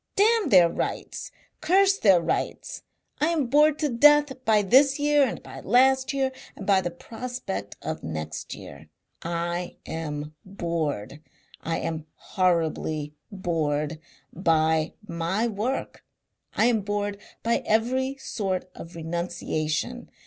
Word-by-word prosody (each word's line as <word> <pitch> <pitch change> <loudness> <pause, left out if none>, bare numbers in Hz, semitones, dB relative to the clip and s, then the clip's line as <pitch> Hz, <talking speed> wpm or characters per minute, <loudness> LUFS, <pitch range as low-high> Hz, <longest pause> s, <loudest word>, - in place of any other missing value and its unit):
Damn 440 +1 +3
their 180 -3 +7
rights! 170 - -4 0.3
Curse 390 +4 +4
their 195 -5 +6
rights! 165 0 -3 0.4
I 300 - +3
am 325 -5 +1
bored 300 +4 +4
to 300 -2 0
death 290 +1 +4
by 215 -1 +4
this 270 +7 +5
year 295 0 +3
and 255 - -2
by - - -9
last 265 +2 +3
year 270 -1 0 0.2
and 195 - -8
by 195 -1 +4
the 175 - -2
prospect 225 - -6
of - - -4
next 80 -1 -5
year. 75 +2 -12 0.3
I 170 +1 -3
am 150 -2 -5
bored 160 - -3 0.4
I 165 0 -2
am 160 -1 -4
horribly 160 -4 -1 0.2
bored 155 -5 -1 0.3
by 160 -2 +2
my 170 +7 -1
work. 230 +5 -3 0.5
I 220 - +3
am 235 -3 +3
bored 205 0 -2 0.2
by 230 0 +2
every 255 +5 0
sort 190 -8 -3
of 170 +1 -10
renunciation. 165 +4 -3
195 Hz, 125 wpm, -26 LUFS, 165-260 Hz, 0.5 s, their